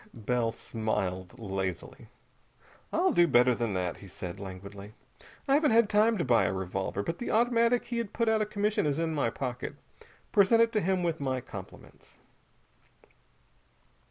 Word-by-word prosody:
Bell 115 +1 0
smiled 100 -3 -3
lazily. 95 -5 -5 0.8
"I'll - - +2
do 175 0 +5
better 125 -3 +5
than 115 -3 -2
that," 90 -2 -2
he 100 - -12
said 90 -1 -7
languidly. 100 +2 -9 0.5
"I 275 - +3
haven't 295 +1 +4
had 225 -1 +4
time 215 +2 +4
to 170 - -1
buy 120 -6 +4
a 85 - 0
revolver. 95 +1 -3
But 165 +10 -4
the 240 - -4
automatic 235 +1 +2
he 235 -1 -3
had 230 -4 -4
put 230 -1 -1
out 220 -1 +3
of 210 - -1
commission 210 -4 0
is 145 -1 0
in 165 -1 -1
my 140 -6 +1
pocket. 125 +1 -5 0.6
Present 205 +3 +5
it 230 - 0
to 215 - +1
him 185 0 0
with 165 -2 -1
my 130 -2 -1
compliments." 100 -7 -12
130 Hz, 165 wpm, -29 LUFS, -, 0.8 s, do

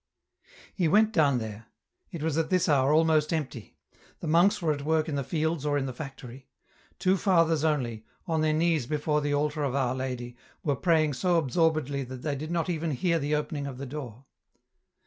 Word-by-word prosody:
He 180 -4 +1
went 215 +6 +4
down 145 - +3
there; 110 -1 -6 0.4
it 170 -5 -6
was 160 -2 0
at 160 0 0
this 185 -1 +2
hour 140 -3 +3
almost 155 0 +3
empty; 135 -9 -4 0.4
the - - -7
monks 175 +7 +4
were 165 -3 +1
at 145 - -6
work 160 +1 +1
in 155 - -3
the 140 -1 -1
fields 160 +1 -1
or 145 -1 +1
in 135 - -1
the 130 - -4
factory; 130 -2 -9 0.5
two 190 +1 +2
fathers 165 -5 +2
only, 125 -8 -1 0.2
on 160 -3 0
their 155 0 +2
knees 160 -4 +1
before 150 0 0
the 145 0 0
altar 150 +1 -1
of 135 -2 -1
Oui 130 -2 0
Lady, 125 -2 -4 0.3
were 145 -2 +1
praying 155 -1 +2
so 175 +6 +1
absorbedly 155 -2 +1
that 130 0 -9
they 150 -2 -1
did 155 +3 -6
not 170 0 -1
even 165 -2 -2
hear 165 +4 0
the 150 +1 0
opening 150 -1 -3
of 130 -2 -7
the 140 - -6
door. 130 -3 -8
150 Hz, 200 wpm, -28 LUFS, 135-165 Hz, 0.5 s, went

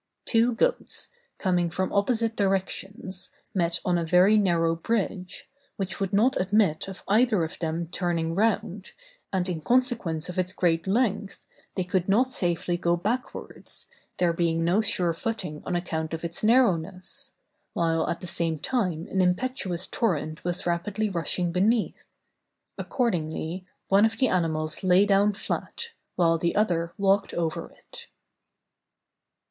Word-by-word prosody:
Two 230 +1 +3
goats, - - 0 0.3
coming 180 -3 +1
from 185 +3 -2
opposite 225 +2 +1
directions, 195 0 -2 0.2
met 170 -2 +1
on 175 -1 +2
a - - -1
very 180 +5 +5
narrow 170 -5 +2
bridge, 185 0 -3 0.3
which 195 -1 -4
would 195 -1 -1
not 225 +5 +3
admit 195 -4 +2
of 190 -1 -9
either 215 -3 +3
of 160 - -5
them 165 0 -2
turning 170 -2 -1
round, 205 -1 -1 0.4
and 185 -2 0
in 170 -4 -3
consequence 230 - +1
of 180 0 -4
its 185 0 0
great 165 -1 +1
length, 205 -2 0 0.3
they 185 - 0
could 180 +1 -1
not 250 +6 +3
safely 175 -3 0
go 170 0 +1
backwards, 230 +8 -4 0.3
there 175 -2 +2
being 165 -1 +1
no 180 +6 +3
sure 185 -6 +2
footing 180 -5 -4
on 180 - -1
account 160 -2 -2
of 160 - -8
its 170 +4 -6
narrowness, 215 +2 +1 0.4
while 165 -1 +1
at 170 - -3
the - - -6
same 165 -2 -1
time 180 - -1
an 190 - +2
impetuous 185 -1 0
torrent 160 -9 -1
was 175 0 -1
rapidly 195 +5 -1
rushing 175 0 -1
beneath; 210 +5 +1 0.7
accordingly, 180 - -2 0.2
one 200 +3 +6
of 225 - -6
the 260 -3 +3
animals 160 -3 0
lay 185 +2 +5
down 200 +1 +4
flat, 465 - -4 0.3
while 165 -2 +3
the 170 +1 0
other 170 -5 +1
walked 195 0 +2
over 165 -2 -2
it. - - -12
185 Hz, 145 wpm, -26 LUFS, 170-210 Hz, 0.7 s, one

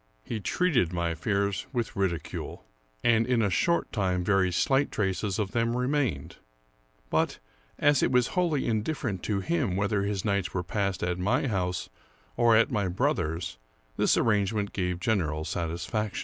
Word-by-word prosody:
He 110 - -4
treated 125 - +1
my 85 -1 -1
fears 100 +3 -1
with 120 -5 -2
ridicule, 85 -6 -3 0.4
and 115 -1 +3
in 125 -3 +2
a 100 - +1
short 170 - +1
time 95 -4 0
very 95 -1 +2
slight 135 +10 +2
traces 95 -1 -1
of 105 -3 -1
them 115 +1 0
remained; 125 - -1 0.7
but, - - +1 0.4
as 145 -2 +4
it - - +2
was 125 -1 +3
wholly 170 -6 +1
indifferent 110 - -1
to 100 -2 0
him 90 0 0
whether 100 +1 +1
his 100 0 -2
nights 100 -3 0
were 90 - 0
passed 100 0 -2
at 90 0 -1
my 110 +10 +1
house 90 -7 -1 0.5
or 120 -1 +5
at 115 +4 +4
my 105 -5 0
brother's, 85 -4 -1 0.4
this - - +3
arrangement 105 -1 +1
gave 90 -2 -1
general 85 -9 0
satisfaction. 85 +6 -2
100 Hz, 155 wpm, -28 LUFS, 90-115 Hz, 0.7 s, or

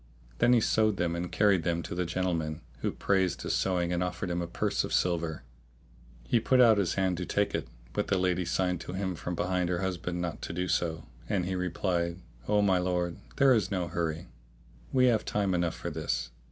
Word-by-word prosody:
Then 125 - +5
he 120 - +6
sewed 110 -2 +2
them 85 -1 0
and 85 +1 -4
carried 100 -4 +3
them 85 +1 -1
to - - -6
the 90 0 -1
gentleman, 85 -3 -1 0.2
who - - -1
praised 95 -4 0
his - - -1
sewing 90 -2 +1
and 85 - 0
offered 90 +1 -2
him 85 0 -1
a 85 - -3
purse - - 0
of - - -5
silver. 85 -5 0 0.8
He 90 - +2
put 130 +3 +3
out 115 -4 +7
his 95 -4 0
hand 95 -2 +1
to 90 - -3
take 100 0 +1
it, - - -2 0.3
but - - -1
the 95 - +2
lady 90 0 +1
signed 90 0 0
to - - -6
him 95 -1 -2
from 90 +1 -4
behind 90 0 0
her 90 -1 -1
husband 90 -1 -2
not 85 -3 -3
to - - -5
do 90 +1 -2
so, 80 -2 -1 0.2
and 100 -4 +1
he 95 - -2
replied, 90 -1 -1 0.3
"O 105 -1 +3
my 95 -2 +3
lord, 90 -1 -1 0.2
there 135 -2 +5
is 110 -4 +1
no 90 -3 -2
hurry, 85 +1 -3 0.6
we 130 -1 +4
have 115 -4 +3
time 100 -2 0
enough 85 -2 0
for 85 - -5
this." 75 -4 -2
90 Hz, 215 wpm, -29 LUFS, 85-95 Hz, 0.8 s, out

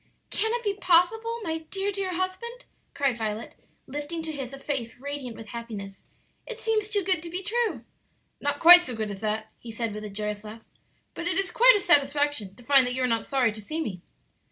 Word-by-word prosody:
"Can 445 +1 0
it 480 - -3
be 410 -2 0
possible, 440 +5 +2
my 320 -2 -2
dear, 395 +1 -2
dear 385 -2 -3
husband?" 420 +7 -4 0.3
cried 270 -4 0
Violet, 220 0 -3 0.3
lifting 295 +4 -5
to 320 - -3
his 270 -4 -6
a 275 - -8
face 270 -4 -3
radiant 270 -2 -6
with 220 -2 -10
happiness. 210 -4 -8 0.4
"It 480 -2 -6
seems 435 -2 0
too 410 -2 0
good 365 -3 +1
to 340 - -7
be 360 +3 -4
true." 460 +2 -1 0.6
"Not 285 0 0
quite 350 +2 +11
so 255 -9 -5
good 215 -2 -3
as 195 0 -8
that," 215 0 -2
he 235 - -9
said, 225 -1 -3
with 210 0 -6
a 210 - -6
joyous 210 +1 -4
laugh, 220 +1 -10 0.5
"But 340 - -5
it 345 - 0
is 390 -2 0
quite - - +7
a - - -2
satisfaction 290 - +2
to 245 - -16
find 270 0 +5
that 250 - -2
you 260 - -1
are - - +3
not 230 -2 -1
sorry 260 -4 +2
to 215 +1 -8
see 310 +10 -4
me." 195 - -4
285 Hz, 220 wpm, -26 LUFS, 225-370 Hz, 0.6 s, quite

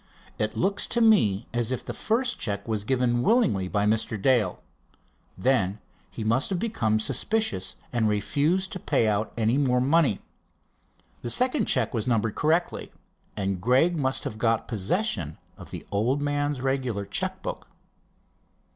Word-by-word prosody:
It 110 0 -1
looks 195 +2 +1
to 235 - +1
me 155 - +4
as 120 0 -1
if 130 - -3
the - - -4
first 245 +3 -1
check 100 -1 -4
was 110 -2 -1
given 125 -1 +1
willingly 120 - +2
by 100 +2 0
Mr. 110 0 0
Dale. 110 -4 +1 0.7
Then 100 -2 +1 0.3
he - - -6
must 115 +5 +1
have 190 - -1
become 115 - 0
suspicious, 110 - -1 0.2
and 115 -3 +2
refused 150 - 0
to 185 - -5
pay 115 - +1
out 105 0 0
any 115 +4 +2
more 125 -3 +2
money. 140 - +3 1.0
The 120 - -4
second 255 - +2
check 125 -4 +2
was 115 -1 -2
numbered 115 -3 +1
correctly, 165 +3 0 0.5
and 95 -2 -2
Gregg 135 - +3
must 130 -1 0
have 110 - -5
got 115 -1 +1
possession 110 - -1 0.2
of - - -12
the - - -8
old 115 +8 +1
man's 145 -1 -1
regular 130 -6 -1
check - - -2
book." - - -6
120 Hz, 155 wpm, -26 LUFS, 105-145 Hz, 1.0 s, me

